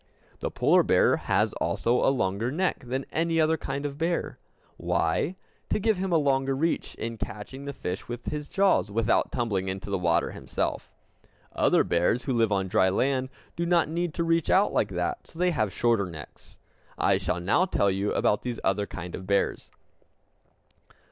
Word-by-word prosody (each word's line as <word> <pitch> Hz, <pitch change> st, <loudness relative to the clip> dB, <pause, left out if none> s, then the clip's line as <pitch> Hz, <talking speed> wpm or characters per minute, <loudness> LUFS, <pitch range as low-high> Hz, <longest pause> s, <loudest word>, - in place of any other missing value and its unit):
The -, -, -2 dB
polar -, -, +4 dB
bear -, -, +3 dB
has -, -, +1 dB
also 120 Hz, +2 st, 0 dB
a -, -, +5 dB
longer 115 Hz, -2 st, 0 dB
neck 180 Hz, -3 st, -1 dB
than 130 Hz, +2 st, -2 dB
any 165 Hz, 0 st, +1 dB
other 160 Hz, 0 st, +3 dB
kind 140 Hz, -2 st, -4 dB
of 145 Hz, 0 st, -5 dB
bear. 170 Hz, +1 st, -1 dB, 0.4 s
Why? 145 Hz, -, 0 dB, 0.3 s
To -, -, +1 dB
give 215 Hz, 0 st, +1 dB
him 190 Hz, 0 st, -2 dB
a 170 Hz, -, +4 dB
longer 135 Hz, -2 st, +1 dB
reach 160 Hz, +5 st, -1 dB
in 115 Hz, -1 st, -5 dB
catching 105 Hz, +7 st, -7 dB
the 140 Hz, -, -3 dB
fish 90 Hz, -8 st, -5 dB
with 120 Hz, 0 st, -6 dB
his 150 Hz, -1 st, -5 dB
jaws 195 Hz, -, +2 dB
without 115 Hz, +2 st, +1 dB
tumbling 100 Hz, -6 st, -1 dB
into 95 Hz, +1 st, -5 dB
the 95 Hz, -, 0 dB
water 85 Hz, -2 st, +1 dB
himself. -, -, -3 dB, 0.6 s
Other -, -, +3 dB
bears, 90 Hz, +8 st, +1 dB
who 135 Hz, -, -1 dB
live 115 Hz, -3 st, +2 dB
on 95 Hz, -1 st, +1 dB
dry 95 Hz, +1 st, +3 dB
land, 130 Hz, +6 st, 0 dB, 0.3 s
do 170 Hz, -, -2 dB
not 170 Hz, -2 st, +2 dB
need 170 Hz, 0 st, -2 dB
to 170 Hz, -, 0 dB
reach 165 Hz, -1 st, +1 dB
out 195 Hz, +2 st, +4 dB
like -, -, +1 dB
that, 365 Hz, -, -2 dB
and -, -, -25 dB
so -, -, -14 dB
they 180 Hz, +1 st, +2 dB
have 110 Hz, -, 0 dB
shorter 115 Hz, -2 st, +1 dB
necks. 80 Hz, -5 st, -11 dB, 0.4 s
I -, -, +3 dB
shall -, -, -1 dB
now 100 Hz, -, +2 dB
tell 100 Hz, -, +1 dB
you 100 Hz, +2 st, -1 dB
about 105 Hz, -, +1 dB
these 125 Hz, -2 st, -4 dB
other 100 Hz, +1 st, +1 dB
kinds 90 Hz, -1 st, -7 dB
of 95 Hz, -, -9 dB
bears. 100 Hz, 0 st, 0 dB
125 Hz, 190 wpm, -27 LUFS, 100-165 Hz, 0.6 s, a